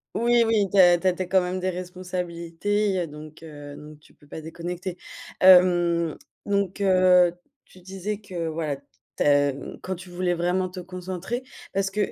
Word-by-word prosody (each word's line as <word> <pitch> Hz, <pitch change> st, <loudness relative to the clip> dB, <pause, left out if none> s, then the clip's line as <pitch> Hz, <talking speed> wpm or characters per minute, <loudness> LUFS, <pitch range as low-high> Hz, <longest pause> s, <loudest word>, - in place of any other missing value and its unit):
Oui, 235 Hz, 0 st, +3 dB
oui 220 Hz, -3 st, +2 dB
tu -, -, +2 dB
as 175 Hz, -1 st, +7 dB
tu 190 Hz, -, -12 dB
as 185 Hz, -, +4 dB
tu 185 Hz, -, -6 dB
as -, -, -1 dB
quand 190 Hz, 0 st, +4 dB
même 180 Hz, +1 st, -3 dB
des 185 Hz, +1 st, -1 dB
responsabilités. 180 Hz, +2 st, -3 dB
Il 195 Hz, -, +1 dB
y -, -, -1 dB
a 175 Hz, -, -1 dB
donc, 155 Hz, +1 st, -12 dB
heu, 145 Hz, -2 st, -10 dB
donc 150 Hz, 0 st, -12 dB
tu -, -, -23 dB
peux 145 Hz, -, -22 dB
pas 160 Hz, -, -8 dB
déconnecter. 175 Hz, +3 st, -6 dB, 0.4 s
Hem, 175 Hz, -3 st, +5 dB, 0.3 s
donc, 200 Hz, -1 st, -1 dB
heu, 185 Hz, -2 st, +5 dB, 0.3 s
tu 185 Hz, -, -18 dB
disais 195 Hz, +3 st, -5 dB
que 180 Hz, -5 st, -5 dB
voilà 155 Hz, -3 st, -3 dB, 0.4 s
tu -, -, +1 dB
as 145 Hz, -1 st, +3 dB, 0.3 s
quand 190 Hz, -, -3 dB
tu 185 Hz, 0 st, -10 dB
voulais 175 Hz, 0 st, -1 dB
vraiment 180 Hz, +2 st, 0 dB
te 180 Hz, 0 st, -9 dB
concentrer 185 Hz, +6 st, -5 dB, 0.3 s
parce 195 Hz, 0 st, 0 dB
que 205 Hz, 0 st, -1 dB
180 Hz, 195 wpm, -25 LUFS, 170-190 Hz, 0.4 s, as